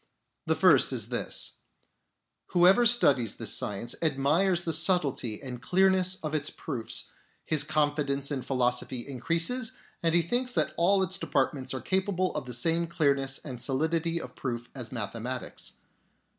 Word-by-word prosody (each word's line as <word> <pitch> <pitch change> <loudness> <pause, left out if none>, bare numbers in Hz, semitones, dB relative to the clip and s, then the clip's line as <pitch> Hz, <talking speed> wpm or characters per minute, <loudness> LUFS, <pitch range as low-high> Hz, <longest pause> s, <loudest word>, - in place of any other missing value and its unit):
The - - +2
first - - +5
is - - -2
this: - - -2 1.0
Whoever 190 +7 +6
studies 140 - +3
this - - -2
science 105 +4 -2
admires 165 +5 +2
the 165 - -2
subtlety 150 - +1
and 125 -2 -6
clearness 185 +4 +2
of 155 0 -3
its 155 -1 0
proofs. 125 -7 -3 0.3
His 155 -2 +2
confidence 145 -2 0
in 135 -2 -2
philosophy 125 -1 0
increases, 165 - 0 0.3
and 165 0 +2
he 170 - +4
thinks 245 +8 -1
that - - 0
all 190 +3 +3
its 190 0 -1
departments 135 -4 -1
are 130 - -4
capable 185 - 0
of 150 -4 -4
the 125 - -5
same 165 +7 0
clearness 140 -5 +1
and 130 -5 -6
solidity 160 +6 0
of - - -9
proof 120 -2 -4
as 125 -4 -7
mathe 105 -6 -4
matics. 125 +2 -6
150 Hz, 150 wpm, -28 LUFS, 130-175 Hz, 1.0 s, Whoever